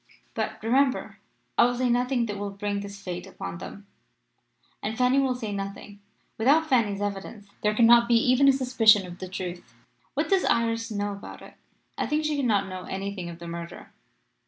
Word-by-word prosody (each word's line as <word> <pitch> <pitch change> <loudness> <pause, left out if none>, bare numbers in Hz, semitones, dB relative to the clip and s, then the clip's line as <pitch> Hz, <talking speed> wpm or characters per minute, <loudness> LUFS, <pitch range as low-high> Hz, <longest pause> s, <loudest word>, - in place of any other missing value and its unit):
But, 220 -1 -3
remember, 260 +4 +1 0.4
I - - +8
will 245 0 +1
say 250 +1 0
nothing 245 0 +1
that 205 -2 -5
will 205 0 -3
bring 200 0 -3
this 200 0 -8
fate 180 -2 -6
upon 170 - -7
them. 200 +2 -9 1.0
And 220 +1 -3
Fanny 255 +2 +3
will 265 -2 +1
say 225 -4 -5
nothing. 200 +1 -6 0.4
Without 290 +8 +4
Fanny's 210 -7 +1
evidence 205 +1 -5
there 210 0 +1
cannot 235 +1 +6
be 235 - +4
even 255 +4 +4
a - - +8
suspicion 240 -6 +4
of 175 0 -10
the 185 - -6
truth.' 180 -1 -7 0.4
"'What - - 0
does 390 -2 +3
Iris 230 0 +1
know 205 -1 -2
about 200 0 -9
it?' - - -13 0.5
"'I - - 0
think 305 +1 0
that - - +1
she 300 - -1
cannot 215 -8 +1
know 185 -1 -7
anything 195 -2 -5
of 170 - -8
the 170 0 -9
murder. 170 0 -8
215 Hz, 190 wpm, -26 LUFS, 200-250 Hz, 1.0 s, I